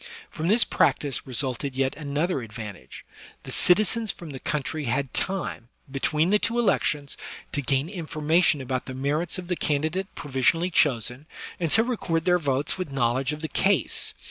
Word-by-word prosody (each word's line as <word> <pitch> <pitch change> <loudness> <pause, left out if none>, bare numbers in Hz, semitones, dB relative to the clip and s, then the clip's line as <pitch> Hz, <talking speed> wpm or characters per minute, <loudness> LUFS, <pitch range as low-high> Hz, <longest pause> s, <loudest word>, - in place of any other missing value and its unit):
Prom 160 0 -3
this 220 +5 +6
practice 140 -2 +1
resulted 130 0 -1
yet 135 0 0
another 150 +1 -1
advantage; 105 -3 -9 0.4
the - - -8
citizens 215 +4 +3
from 170 -5 -5
the 135 - -7
country 150 +2 -2
had 130 +2 -1
time, 190 -11 -2 0.2
between 155 +5 +1
the 210 - +4
two 230 +2 -1
elections, 150 - +1 0.3
to 145 - -1
gain 135 +2 +1
information 165 -3 +1
about 130 -1 -3
the 130 - -6
merits 150 +7 -1
of 180 -1 -7
the 180 - 0
candidate 155 +6 0
provisionally 150 +6 +1
chosen, 130 -2 +1 0.3
and 165 -4 0
so 225 - +6
record 185 -9 -1
their 180 0 +4
votes 140 +3 -1
with 180 -6 -4
knowledge 130 +1 +1
of 150 0 -6
the 160 - -2
case. 200 +5 0
150 Hz, 165 wpm, -25 LUFS, 135-175 Hz, 0.4 s, this